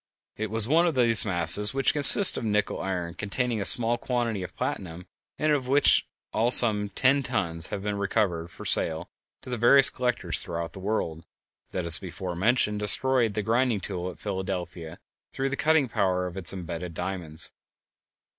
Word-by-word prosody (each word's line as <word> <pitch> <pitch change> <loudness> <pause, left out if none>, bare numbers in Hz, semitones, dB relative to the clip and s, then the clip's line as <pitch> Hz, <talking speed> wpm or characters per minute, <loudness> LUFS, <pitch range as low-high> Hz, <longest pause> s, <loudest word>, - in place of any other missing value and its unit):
It 110 0 -5
was 110 0 0
one 165 +5 +2
of 165 - -3
these 115 -4 +2
masses, 95 +5 +3
which 135 - +1
consist 150 +7 +7
of - - -6
nickel 105 -1 -2
iron 90 -3 -5
containing 110 +4 -4
a - - -2
small 120 +2 +4
quantity 120 -5 -3
of 90 - -9
platinum, 90 -1 -6 0.3
and 155 0 -1
of 140 -4 -2
which 140 +2 +4 0.3
in - - -4
all 115 +2 +1
some 105 -5 +6
ten 135 +7 +1
tons 85 -11 -1
have 100 - -7
been 105 -1 -4
recovered 95 -5 -2
for - - -13
sale 80 +1 -1 0.3
to 125 - -10
the 120 - -4
various 135 +4 +4
collectors 125 -1 -2
throughout 85 0 -6
the 95 - -10
world, 95 -5 -4 0.5
that 90 -2 -5
as 85 -2 +3
before 90 -1 -8
mentioned 105 +2 -1
destroyed 115 +1 +3
the 105 - -3
grinding 115 0 -1
tool 90 -1 -6
at 90 - -12
Philadelphia 90 -4 -7 0.4
through 135 +1 -3
the 140 - -4
cutting 155 -2 +1
power 90 -4 -2
of 90 0 -8
its 90 -5 +3
embedded 85 -2 -8
diamonds. 90 -3 -5
105 Hz, 180 wpm, -25 LUFS, 90-125 Hz, 0.5 s, consist